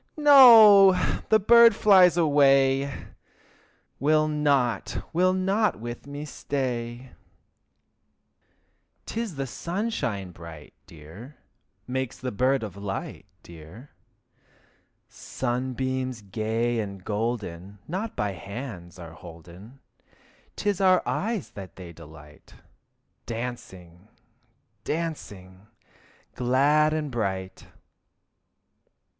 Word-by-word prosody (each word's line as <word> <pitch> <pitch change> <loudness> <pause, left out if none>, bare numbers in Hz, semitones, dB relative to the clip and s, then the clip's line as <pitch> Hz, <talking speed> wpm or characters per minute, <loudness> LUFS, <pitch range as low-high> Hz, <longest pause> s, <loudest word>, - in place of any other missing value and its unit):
No! 230 -10 +8 0.4
the 220 - +5
birdie 235 +3 +6
flies 185 -5 +5
away! 140 -3 +2 0.9
Will 155 +2 +2
not, 145 -5 -1
will 180 +2 +2
not 190 - 0
with 120 +3 -8
me 145 +1 -7
stay. 125 -3 -5 1.9
'Tis 225 -6 -5
the 135 -1 -4
sunshine 135 - -4
bright, 80 -3 -12
dear, 85 - -13 0.5
Makes 130 -1 -4
the 130 -1 -5
bird 130 +4 0
of 100 -4 -7
light, 100 -1 -7 0.2
dear. 85 - -14 1.2
Sunbeams 130 -1 -4
gay 115 +4 -2
and 100 -3 -7
golden 105 -4 -4
Not 195 +7 -5
by 105 -1 -2
hands 100 -3 -9
are 85 -2 -11
holden. 90 - -14 0.7
'Tis 205 -2 -2
our 185 -1 +4
eyes 220 -1 -3
that 95 -3 -11
they 90 -2 -11
delight, 75 -2 -16 0.7
Dancing, 100 -7 -8 0.8
dancing, 105 - -6 0.7
glad 140 +5 +2
and 155 -2 -3
bright. 95 -5 -4
125 Hz, 90 wpm, -25 LUFS, 100-155 Hz, 1.9 s, No